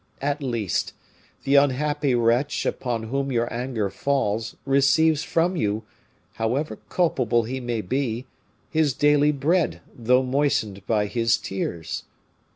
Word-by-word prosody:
At 145 +2 -1
least, 115 - -1 0.5
the 135 - 0
unhappy 145 0 +2
wretch 120 +4 +1
upon 120 -3 -2
whom 135 +4 -2
your 120 -1 +1
anger 120 -5 -2
falls 115 -2 -1
receives 140 +3 +3
from 170 +4 +1
you, 110 -6 -1 0.5
however 125 +7 -1
culpable 125 - +1
he 130 +4 -4
may 120 -3 -2
be, 125 +2 -2 0.5
his 155 -4 +2
daily 150 0 +4
bread 155 +5 +1 0.2
though 125 +2 +3
moistened 125 -7 0
by 105 -2 +2
his 115 +2 +1
tears. 85 -4 -4
130 Hz, 125 wpm, -24 LUFS, 115-145 Hz, 0.5 s, daily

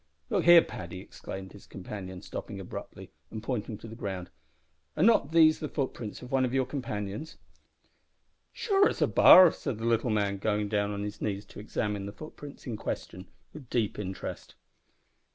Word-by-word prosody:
"Look 195 -5 +1
here, 175 -1 +9
Paddy," 90 +1 -7
exclaimed 95 0 -8
his 100 - -14
companion, 95 -1 -8
stopping - - -6
abruptly, - - -8 0.2
and 110 -1 -7
pointing 115 -3 -3
to 115 - -11
the 110 - -9
ground, 95 -5 -5 0.7
"are 155 - +3
not 205 -9 +4
these 160 -1 +6
the 150 - -4
footprints 125 -7 -4
of 125 - -10
one 135 -1 +3
of 130 0 0
your 130 -1 +2
friends?" 115 -1 -5 1.1
"Sure 400 -2 +3
it's - - -5
a - - +6
bar," 185 -3 +9
said 120 - -4
the 115 - -5
little 115 +1 +2
man, 100 -2 0
going 105 0 0
down 105 -1 +1
on 100 0 -3
his 105 0 -6
knees 100 -1 -2
to - - -12
examine 105 -1 -3
the - - -5
footprints 145 +3 -11
in 115 -4 -4
question 90 -2 -5 0.3
with 140 -6 -11
deep 110 -4 0
interest. 95 -2 -6
110 Hz, 175 wpm, -29 LUFS, 100-135 Hz, 1.1 s, here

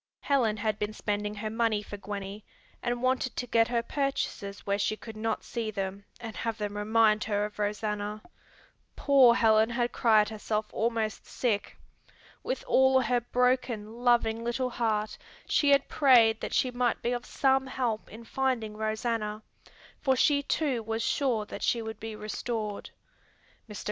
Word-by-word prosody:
Helen 240 -7 +1
had 215 0 -1
been 210 +1 -2
spending 210 0 -2
her 215 +1 -4
money 225 -2 +1
for 205 - -8
Gwenny, 200 0 -6 0.4
and 240 0 -2
wanted 255 0 0
to 245 - -2
get 225 -1 +3
her 235 -1 0
purchases 250 -7 -3
where 200 0 0
she 215 +1 0
could 225 0 -10
not 220 0 -2
see 230 -2 -4
them 200 -1 -4
and 225 -2 -7
have 230 -1 -2
them 205 -1 -4
remind 215 0 +3
her 205 -1 0
of 210 0 -9
Rosanna. 210 0 -2 0.7
Poor 265 -4 +6
Helen 220 -1 +4
had 240 0 -1
cried 215 -3 +4
herself 215 0 -2
almost 225 -2 -1
sick. 220 -5 -2 0.6
With - - -3
all 265 - +5
her 245 0 +1
broken, 240 -3 0
loving 230 -2 +3
little 250 +2 -1
heart 215 -3 -1 0.3
she 290 - +2
had 280 0 +4
prayed 235 -6 +5
that - - -3
she 255 - +2
might 245 -1 0
be 240 - 0
of 245 0 -2
some 265 0 +1
help 245 -4 -2
in 225 +2 -11
finding 230 -3 -1
Rosanna, 215 0 -2 0.6
for 265 -2 +3
she 285 +2 +3
too 280 -4 0
was 225 +1 -3
sure 235 -4 0
that - - -8
she 235 - +1
would 220 -1 -6
be 220 -1 -6
restored. 215 0 -4 0.8
Mr. 210 - -7
225 Hz, 165 wpm, -29 LUFS, 210-245 Hz, 0.8 s, Poor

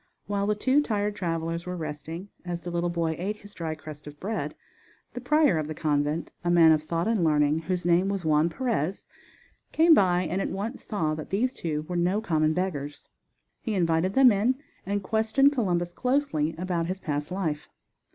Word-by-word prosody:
While 200 0 -1
the 210 - +2
two 260 +7 +3
tired 210 -6 -1
travelers 165 -2 -3
were 180 0 -3
resting, 160 +4 -6
as 175 -1 -4
the 175 - -6
little 175 0 0
boy 165 -2 -1
ate 205 +4 -2
his 205 0 -15
dry 160 -2 -4
crust 150 -1 -10
of 150 0 -10
bread, 215 +3 -3 0.6
the 245 - -6
prior 295 - +3
of 155 - -3
the 155 - -5
convent, 150 0 0
a 175 - 0
man 170 -2 +7
of 155 -1 +3
thought 165 +3 -2
and 225 -5 +1
learning, 150 -1 +3
whose 180 +1 -3
name 175 +3 +3
was 195 -4 -3
Juan 155 +1 +3
Perez, 200 - -2 0.6
came 325 +1 +6
by 180 - +4
and 180 +3 -2
at - - -2
once 215 +6 -4
saw 160 -8 -1
that 155 0 -6
these 245 +7 0
two 155 -2 -3
were 175 +3 -5
no 180 +4 +2
common 155 -7 +1
beggars. 150 -5 -4 0.5
He 220 -4 -2
invited 170 +1 +1
them 265 -2 +7
in 220 +6 +2 0.3
and 200 0 -1
questioned 220 +7 +3
Columbus 175 -8 0
closely 250 - 0
about 175 -1 -1
his 185 +2 -2
past 150 -5 -3
life. 165 -5 -3
175 Hz, 190 wpm, -27 LUFS, 160-205 Hz, 0.6 s, man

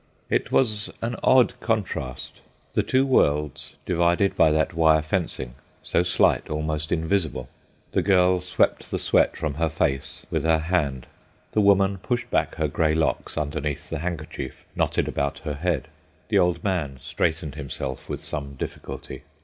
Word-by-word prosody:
It - - +1
was 110 -4 +2
an 120 +1 -1
odd 130 -2 +4
contrast; 70 - -3 0.3
the - - +3
two 130 +1 +2
worlds 75 - +1
divided 85 +3 +2
by 80 - +5
that 80 +1 +1
wire 80 -2 +4
fencing—so 75 -6 -2
slight, 90 0 +2
almost 75 0 -2
invisible. 80 -6 0 0.4
The - - +2
girl 90 -2 +4
swept 90 0 +1
the - - -1
sweat - - +2
from 75 -2 -2
her 80 +3 0
face 70 -4 -2
with - - +1
her 80 0 +4
hand; 80 -6 -1 0.5
the 105 - +2
woman 100 -1 +4
pushed 120 +6 -2
back - - +1
her 80 - 0
grey 80 +1 +1
locks 80 0 -1
underneath 75 -1 -3
the - - -2
handkerchief 80 -5 -5
knotted - - +1
about 70 +1 -1
her 75 - -1
head; 85 +4 -1 0.4
the 105 -3 +4
old 90 +1 +2
man 80 -10 -1
straightened 80 -2 -1
himself 70 -2 -6
with - - -4
some 70 -2 -4
difficulty. - - -7
80 Hz, 150 wpm, -25 LUFS, 75-90 Hz, 0.5 s, by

